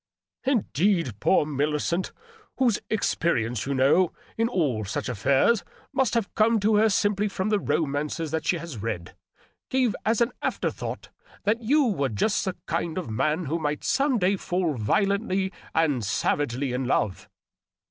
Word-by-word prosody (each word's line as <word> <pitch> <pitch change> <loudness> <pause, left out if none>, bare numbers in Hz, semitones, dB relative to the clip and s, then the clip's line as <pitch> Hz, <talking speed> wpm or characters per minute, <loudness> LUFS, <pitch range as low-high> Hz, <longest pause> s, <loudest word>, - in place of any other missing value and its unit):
" - - -65
Indeed, 170 - 0
poor 170 - +3
Millicent 150 +4 -1 0.2
— 435 -1 -29
^whose 240 -5 +3
expe 185 -5 +1
rience, 115 +1 -2
you 140 - 0
know, 145 +7 +3 0.2
in 230 +1 +1
all 140 - 0
such 100 - -3
affairs 135 - +2 0.3
must 265 -3 +1
have 230 -4 -1
come 225 +1 +3
to 210 +1 +3
her 220 +1 +5
simply 205 +1 +1
from 195 0 -2
the 210 -1 +2
romances 150 -1 -1
that 160 0 -2
she 180 - +2
has 165 -8 -7
read 90 -5 -4 0.3
— - - -38
^gave 255 -4 +2
as 220 0 +1
an 235 +1 +2
after - - -1
thought - - -6 0.3
that 220 +3 +1
you 285 +7 +3
were 155 - 0
just 115 - 0
the 190 -2 -2
kind 165 0 -2
of 170 -11 -4
man 155 +9 0
who 160 +4 -1
might 150 -1 -2
some 270 -1 +2
day 195 0 +2
fall 175 -3 -1
violently 195 - 0 0.2
and 150 -7 +2
sav 100 - 0
agely 135 -1 -2
in 125 +1 -1
love." 105 -6 -1
170 Hz, 175 wpm, -26 LUFS, 140-210 Hz, 0.3 s, her